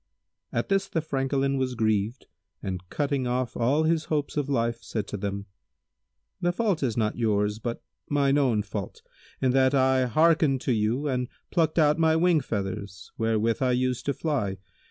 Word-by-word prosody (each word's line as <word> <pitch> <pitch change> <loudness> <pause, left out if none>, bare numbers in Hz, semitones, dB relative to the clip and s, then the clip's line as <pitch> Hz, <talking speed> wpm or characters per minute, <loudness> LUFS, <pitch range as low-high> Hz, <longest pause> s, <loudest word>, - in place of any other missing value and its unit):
At - - -2
this 195 -1 +2
the 165 - -1
Francolin 135 -2 0
was 130 -1 -1
grieved 110 +1 0 0.4
and 95 -2 -3
cutting 140 -3 -1
off 125 0 -1
all 135 +7 +2
his 160 0 +1
hopes 150 -2 -2
of 145 -2 -1
life 115 -3 0
said 110 -3 -3
to - - -4
them, 100 0 -4 1.0
"The 175 - +2
fault 200 -2 0
is 120 -5 -1
not 110 0 0
yours, 105 -2 +1
but 120 +1 -4 0.3
mine 145 -1 +3
own 120 -7 +2
fault, 100 -1 -6 0.4
in 130 - +4
that 130 +1 +3
I 130 -1 +3
hearkened 155 +1 +3
to - - -1
you 115 +6 0
and 125 -2 -1 0.2
plucked 165 -2 +1
out 150 -1 +4
my 160 -1 +4
wing 170 0 +4
feathers 100 -4 -5
wherewith 115 +1 +1
I 130 -1 +2
used 125 0 -1
to 140 - +2
fly. 125 -12 -1
130 Hz, 175 wpm, -26 LUFS, 110-145 Hz, 1.0 s, in